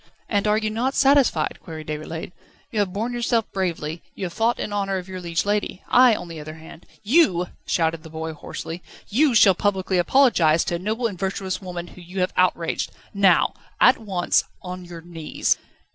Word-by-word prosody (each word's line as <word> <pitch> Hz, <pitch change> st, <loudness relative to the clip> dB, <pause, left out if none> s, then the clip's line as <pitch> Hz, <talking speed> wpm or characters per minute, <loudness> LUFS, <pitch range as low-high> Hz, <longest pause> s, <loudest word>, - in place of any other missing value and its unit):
"And 205 Hz, -1 st, 0 dB
are 210 Hz, 0 st, +3 dB
you 215 Hz, -1 st, -1 dB
not 250 Hz, +5 st, -1 dB
satisfied?" 270 Hz, -, +3 dB
queried 160 Hz, -2 st, -8 dB
Déroulède. 155 Hz, +3 st, -5 dB, 0.4 s
"You 220 Hz, -, -1 dB
have 200 Hz, -3 st, +1 dB
borne 225 Hz, +5 st, -2 dB
yourself 235 Hz, -2 st, +1 dB
bravely, 170 Hz, -4 st, -2 dB
you 195 Hz, -, -4 dB
have 175 Hz, -, -5 dB
fought 230 Hz, +4 st, +1 dB
in 205 Hz, -, -3 dB
honour 195 Hz, -1 st, 0 dB
of 180 Hz, 0 st, -6 dB
your 185 Hz, -1 st, -6 dB
liege 170 Hz, 0 st, -1 dB
lady. 205 Hz, -2 st, -1 dB
I, 250 Hz, -2 st, +6 dB
on 180 Hz, -, -6 dB
the 165 Hz, -2 st, -8 dB
other 155 Hz, +1 st, -8 dB
hand 160 Hz, +1 st, -13 dB
..." -, -, -42 dB, 0.2 s
"You," 180 Hz, -, +3 dB, 0.2 s
shouted 165 Hz, -1 st, +1 dB
the 160 Hz, -, -11 dB
boy 160 Hz, 0 st, -5 dB
hoarsely, 165 Hz, +3 st, -7 dB, 0.3 s
"you 265 Hz, +3 st, +3 dB
shall 200 Hz, -3 st, +7 dB
publicly 190 Hz, -1 st, 0 dB
apologise 175 Hz, -, +4 dB
to 175 Hz, -, -2 dB
a -, -, -10 dB
noble 220 Hz, +6 st, -2 dB
and 200 Hz, -6 st, -2 dB
virtuous 190 Hz, -1 st, -2 dB
woman 175 Hz, -2 st, -5 dB
whom 180 Hz, -, -13 dB
you 185 Hz, +2 st, -5 dB
have 180 Hz, -, 0 dB
outraged 175 Hz, -2 st, +1 dB, 0.2 s
now 195 Hz, -4 st, +4 dB, 0.3 s
at 255 Hz, -, +6 dB
once 190 Hz, -5 st, +1 dB, 0.2 s
on 180 Hz, 0 st, -7 dB
your 170 Hz, -1 st, -9 dB
knees 165 Hz, -2 st, -1 dB
185 Hz, 195 wpm, -23 LUFS, 170-215 Hz, 0.4 s, shall